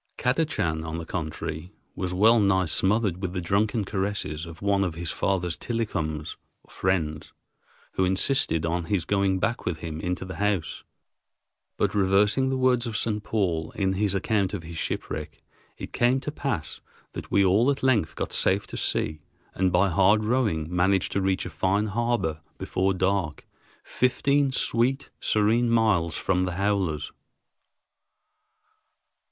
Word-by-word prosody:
Kadachan, 125 - 0
on 80 0 -4
the 85 - -5
contrary, 80 +1 -5 0.2
was 90 -1 -3
well 110 +6 +5
nigh 95 -2 +3
smothered 95 +2 +1
with 90 -2 -3
the 90 - -2
drunken 100 +4 0
caresses 95 -5 -2
of 80 -1 -10
one 100 -1 +2
of 90 -4 -2
his 85 -1 -3
father's 90 -4 -1
tillicums 80 -10 -3 0.3
(friends), 80 -5 -2 0.6
who 95 - 0
insisted 95 - +1
on 85 0 -1
his 90 -3 -1
going 100 -2 +1
back 115 +6 -1
with 85 -3 -2
him 80 -1 -6
into 90 +2 -3
the 95 - -7
house. 100 -5 -1 0.9
But - - +1
reversing 105 +6 +3
the 130 - 0
words 125 -2 +2
of 110 -2 -2
St. 105 -2 -1
Paul 85 -8 -1
in 95 -2 +1
his 100 0 0
account 100 0 0
of 90 - -6
his 85 0 -9
shipwreck, 75 0 -4 0.4
it - - -8
came 125 +2 +3
to 150 - -4
pass 110 - -4 0.3
that - - -8
we 100 - +3
all 105 +8 +4
at 140 -1 -1
length 115 -11 +2
got - - -4
safe 95 +2 +1
to - - -8
sea 75 0 -1 0.3
and 95 0 +1
by 90 +3 +3
hard 100 +5 +4
rowing 110 -10 +1
managed 95 +1 +2
to 100 - 0
reach 95 -1 0
a - - -6
fine 100 +3 +1
harbor 110 -7 -1 0.2
before 95 +1 0
dark, 95 -4 -1 0.4
fifteen 140 +2 +1
sweet, 130 +2 0
serene 110 +3 +2
miles 105 -8 +2
from 90 -1 +1
the 90 - -3
howlers. 95 -5 -1
95 Hz, 155 wpm, -26 LUFS, 85-110 Hz, 0.9 s, well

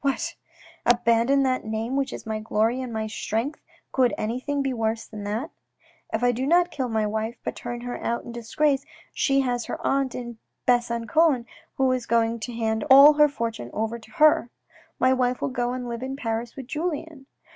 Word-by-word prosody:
What! 275 -1 0 0.5
abandon 240 +3 +3
that 255 -1 0
name 220 +3 -3
which 275 -1 0
is - - -8
my 220 -1 -2
glory 225 +3 0
and 255 -2 -5
my 220 -1 -2
strength. 225 +5 -3 0.3
Could 255 -2 +2
anything 255 +6 -2
be 270 -1 -1
worse 225 -1 -1
than 210 -1 -8
that? 225 +10 -3 0.3
" - - -31
If 220 +2 -1
I 245 - +5
do 255 +3 -2
not 350 +2 +4
kill 260 -3 -2
my 220 -1 +1
wife 220 +2 -2
but - - -3
turn 240 0 -6
her 245 0 -5
out 235 - -1
in - - -8
disgrace, 270 +4 0 0.3
she 275 -1 +2
has 245 -3 -1
her - - -5
aunt 270 -2 +1
in 240 -2 -7 0.3
Besangon 240 +3 +2 0.3
who 265 -1 +2
is 255 -2 -2
going 230 0 +2
to 235 +3 -5
hand 220 -1 -1
all 280 +3 +10
her 300 0 +5
fortune 230 - -4
over 225 +2 -2
to 225 - -17
her. 305 -7 +4 0.5
My 255 0 +4
wife 250 -1 +1
will - - -1
go 245 -2 -1
and 250 -1 -4
live 235 0 -5
in 265 +1 -4
Paris 230 -2 -3
with 270 - -7
Julien. 305 -1 -4
245 Hz, 200 wpm, -25 LUFS, 230-270 Hz, 0.5 s, all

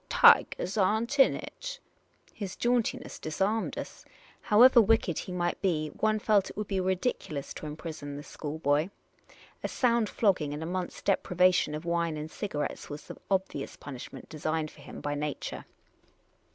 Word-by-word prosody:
Tigahs 190 +5 +5
are 210 +3 +3
n't 255 +5 -3
in 270 - +6
it." - - -7 0.5
His 195 -3 -5
jauntiness 245 +1 0
disarmed 195 +8 -1
us. - - -7 0.4
However 240 +3 +7
wicked 215 -6 +2
he - - -6
might 175 -1 -1
be, 155 -5 +1
one 215 +5 +1
felt 210 -2 +2
it - - -11
would 210 -1 -3
be 195 -2 0
ridiculous 185 - -2
to 155 - -7
imprison 150 -2 -6
this 145 - -9
schoolboy. 150 +1 -1 0.7
A - - 0
sound 235 -4 +2
flogging 180 -9 +1
and 155 - -5
a - - -3
month's 180 +1 -4
deprivation 180 -4 +3
of 155 +2 -6
wine 170 -2 0
and 155 +1 -6
cigarettes 150 -8 -4
was 145 +1 -7
the - - -9
obvious 190 -8 -1
punishment 135 -4 -9
designed 155 0 -2
for 145 - -16
him - - -9
by 145 - -2
nature. 145 -1 -4
180 Hz, 160 wpm, -29 LUFS, 150-215 Hz, 0.7 s, However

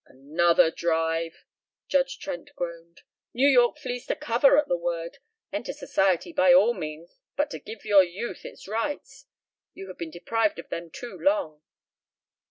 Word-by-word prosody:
"Another 160 +5 +2
drive!" 165 0 -1 0.4
Judge - - +1
Trent 285 0 -6
groaned. 170 -1 -7 0.3
"New 265 +4 +4
York 250 0 +4
flees 245 -5 -5
to - - 0
cover 245 +5 +4
at 295 -1 +3
the - - +1
word. 170 +5 -4 0.3
Enter - - -3
Society 195 - 0
by 275 -2 +5
all 240 -3 +6
means, 155 -3 -8 0.2
but 290 0 0
to - - -5
give 220 0 -10
your 205 -2 +7
youth 185 +7 -6
its - - -11
rights. 230 +8 -4 0.5
You 195 - -9
have 185 - -10
been 170 - -4
deprived 225 - -1
of - - -9
them 170 0 -5
too 240 +8 -9
long." 285 - 0
195 Hz, 160 wpm, -26 LUFS, 170-265 Hz, 0.5 s, your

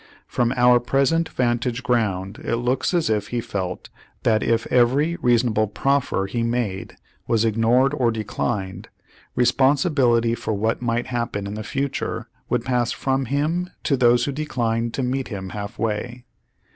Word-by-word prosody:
From 120 -1 0
our 125 0 +5
present 140 +6 +1
vantage 120 0 -1
ground 105 -6 -1
it - - 0
looks 125 +2 0
as 175 -3 +1
if 105 -2 0
he 120 - -2
felt 95 -5 -4 0.3
that 110 -1 +3
if 115 0 +1
every 135 +7 +3
reasonable 115 -3 +2
proffer 125 0 0
he 110 +5 -3
made 115 -5 -2 0.3
was 115 -1 +2
ignored 115 +5 +3
or 125 -5 +2
declined, 100 -3 -3 0.5
responsibility 125 -2 +3
for 110 -2 -2
what 110 +4 -1
might 120 0 0
happen 120 -5 -3
in 100 - -5
the 110 - -5
future 135 +4 -3 0.2
would 120 -1 0
pass 125 -2 +1
from 135 0 -1
him 155 +8 -1
to 140 - +2
those 120 -1 +4
who 145 - -2
declined 120 -5 -2
to 135 - -1
meet 130 +1 -1
him 95 -4 -6
half 105 +4 -6
way. 115 +3 -3
120 Hz, 155 wpm, -22 LUFS, 110-130 Hz, 0.5 s, our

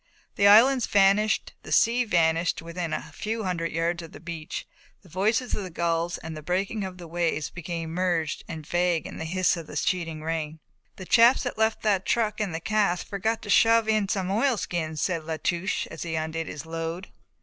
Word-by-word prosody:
The 200 - +4
islands 240 +5 +6
vanished, 200 +2 +3
the - - -11
sea 245 +2 +4
vanished 165 -3 +2
to - - -7
within 170 -1 -4
a - - -4
few 220 +1 -3
hundred 175 -3 -2
yards 170 +1 -1
of 165 - -11
the - - -10
beach, 165 -1 -6 0.4
the 185 - -18
voices 220 +8 0
of - - -1
the 185 - -6
gulls 170 0 -1
and 160 0 -7
the 155 - -7
breaking 195 +6 -1
of 185 -1 -6
the 175 -2 -10
waves 165 -2 -1
became 165 -1 -5
merged 170 -3 -1
and 160 -2 -7
vague 175 -1 +1
in - - -8
the 160 - -4
hiss 185 +3 +1
of 165 -3 -8
the - - -9
sheeting 165 -4 -1
rain. 160 -1 -3 0.4
"The 185 - -9
chaps 235 +6 +5
that 250 -3 -4
left 220 0 +1
the 200 -4 +2
truck 215 -1 0
in 205 -4 -1
that 160 +1 -6
cask 205 -5 +1
forgot 220 +3 -2
to 205 - -3
shove 225 0 +5
in 215 -3 +1
some 190 -2 -1
oilskins," 180 - 0
said 170 -1 -1
La 160 0 -4
Touche 175 +3 -1
as 160 - -8
he 165 -1 -3
undid 160 0 -3
his 150 +1 -7
load. 165 +3 -5
175 Hz, 205 wpm, -26 LUFS, 165-205 Hz, 0.4 s, islands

